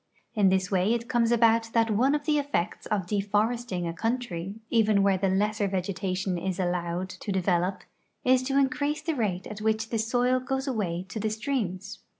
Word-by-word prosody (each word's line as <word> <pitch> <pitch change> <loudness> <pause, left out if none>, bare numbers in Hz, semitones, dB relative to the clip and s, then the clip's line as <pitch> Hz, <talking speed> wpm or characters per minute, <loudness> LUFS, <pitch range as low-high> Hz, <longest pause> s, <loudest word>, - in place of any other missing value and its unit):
In 205 -4 +4
this 190 0 +1
way 195 +4 +2
it 235 0 -4
comes 240 -2 +2
about 230 -1 +3
that 230 -1 +3
one 255 +7 +3
of 290 -1 -3
the 300 -2 +2
effects 285 -11 -2
of 200 -4 -1
deforesting 205 0 0
a 165 - -3
coun 225 +8 0
try, 195 -5 -6 0.2
even 215 -3 +4
where 195 -2 +3
the 195 0 +1
lesser 205 +2 +1
vegetation 190 -1 -2
is 190 +1 -3
allowed 175 0 -1
to 185 +2 -6
develop, 185 0 0 0.4
is 255 0 +4
to 270 +1 -1
increase 285 +2 +1
the 325 - -1
rate 200 -9 -1
at 210 0 -7
which 220 0 0
the 225 - -1
soil 245 +3 +2
goes 265 +2 -3
away 185 -8 -2
to 220 - -5
the 215 +1 0
streams. 210 -5 -3
210 Hz, 190 wpm, -27 LUFS, 190-240 Hz, 0.4 s, In